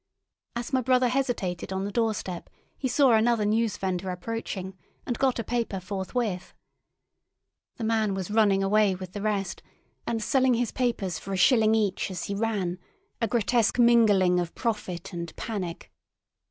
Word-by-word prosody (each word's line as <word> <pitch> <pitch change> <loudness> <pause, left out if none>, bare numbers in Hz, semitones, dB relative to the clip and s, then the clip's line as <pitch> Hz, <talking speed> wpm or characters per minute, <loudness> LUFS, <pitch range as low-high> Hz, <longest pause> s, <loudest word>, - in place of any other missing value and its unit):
As 240 +2 -4
my 260 - +3
brother 255 0 +3
hesitated 235 -10 -2
on 190 +1 -2
the 205 - -4
door 225 -1 +1
step, 180 -3 -6 0.3
he 265 - -2
saw 265 +1 +4
another 225 -1 +3
newsvendor 195 -4 0
approaching, 190 -1 -5 0.3
and 245 - -1
got 265 -2 +2
a 230 - -2
paper 230 -5 -2
forthwith. 190 +1 -3 1.2
The 235 - -6
man 220 -3 +1
was 190 +1 -4
running 205 -3 +3
away 200 0 +3
with 185 0 -8
the 205 - -5
rest, 200 -3 -2 0.5
and 225 -2 -1
selling 260 0 +3
his 235 -1 -1
papers 220 -9 -1
for 195 - -6
a - - -1
shilling 220 +2 +5
each 205 -4 0
as 180 -2 -5
he 200 - -3
ran—a 220 - -3
grotesque 230 +1 +1
mingling 210 -7 +5
of 175 -1 -4
profit 210 -8 -3
and 170 -1 -6
panic. 190 -6 -5
215 Hz, 155 wpm, -27 LUFS, 190-235 Hz, 1.2 s, shilling